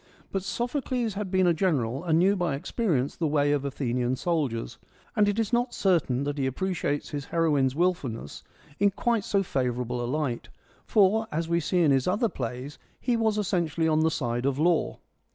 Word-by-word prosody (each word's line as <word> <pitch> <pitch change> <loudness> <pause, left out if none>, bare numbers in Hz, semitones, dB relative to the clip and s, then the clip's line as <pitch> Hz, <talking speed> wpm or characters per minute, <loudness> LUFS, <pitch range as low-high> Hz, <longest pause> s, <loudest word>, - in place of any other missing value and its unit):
But 195 - -1
Sophocles 240 +1 -2
had 200 0 -4
been 185 0 +3
a 175 - +4
general, 140 -7 0
and 160 -3 +2
knew 190 +4 +4
by 175 -7 0
experience 145 - -1
the 165 - -1
way 145 -1 +2
of 145 -2 +1
Athenian 125 -2 -1
soldiers, 135 - -2 0.4
and 205 -1 +4
it 205 - -1
is 225 0 -1
not 240 +1 +1
certain 160 -9 +1
that 145 0 -3
he 135 - +1
appreciates 150 0 -2
his 145 -2 -4
heroine's 145 -6 +1
wilfulness 145 - -1 0.4
in 205 +1 +5
quite 230 +2 0
so 200 -1 +1
favourable 125 -5 -2
a 120 - -3
light; 140 -4 -2 0.4
for, 215 +2 +3
as 160 +2 -2
we 170 0 +2
see 175 +2 +1
in 150 - +4
his 135 -2 +2
other 210 +5 +1
plays, 125 - -6 0.2
he 245 -1 0
was 220 -2 +1
essentially 170 -5 0
on 155 -1 +3
the 160 +1 +3
side 120 -4 -1
of 140 -1 0
law. 165 +2 +1
160 Hz, 190 wpm, -27 LUFS, 135-195 Hz, 0.4 s, in